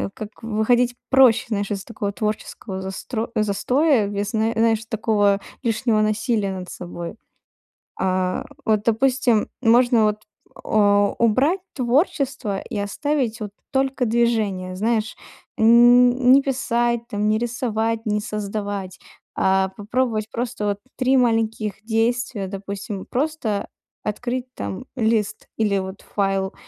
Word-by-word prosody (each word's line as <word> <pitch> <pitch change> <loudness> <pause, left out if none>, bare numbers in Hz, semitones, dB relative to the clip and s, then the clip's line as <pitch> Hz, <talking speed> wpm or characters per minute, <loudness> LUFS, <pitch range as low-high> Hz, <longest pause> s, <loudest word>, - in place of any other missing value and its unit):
Как 215 -2 -6
выходить 235 +3 +2
проще, 260 -4 +5
знаешь, 205 -3 -1
из 195 -2 -3
такого 210 -3 -4
творческого 210 -2 -4
застро 205 +4 -4
застоя 220 +4 +2
без, 205 +1 -3
знае 225 0 +1
знаешь, 225 -1 +2
такого 210 -3 +1 0.2
лишнего 225 -1 +1
насилия 215 -1 0
над 185 -1 -6
собой. 175 -1 -7 0.8
А, 185 -1 0 0.2
вот, 215 -2 +2
допустим, 240 0 +2
можно, 240 0 +4
вот, 215 0 +1 0.4
э, 205 -1 +3
убрать 265 - +3
творчество 260 - 0
и - - -6
оставить 240 +3 -1
вот 210 -2 -5 0.2
только 265 -1 +1
движение. 215 -6 0
Знаешь, 220 +2 0 0.4
нь - - 0
нь 245 +2 +6
не 275 - +7
писать 240 -3 0
там, 210 0 -1
не 215 - +3
рисовать, 230 -1 -1
не 210 -1 +1
создавать, 205 -3 -4 0.4
а 190 0 +2
попробовать 220 0 -1
просто 240 -2 -3
вот 200 0 -1 0.2
три 260 +1 +2
маленьких 225 -4 0
действия. 225 -2 0
Допустим, 200 0 -6
просто 255 -7 -2 0.4
открыть 250 +4 -3
там 100 - -5
лист 220 -3 0
или 210 -3 +1
вот 190 +1 -5
файл, 195 -1 -1
220 Hz, 125 wpm, -22 LUFS, 205-240 Hz, 0.8 s, не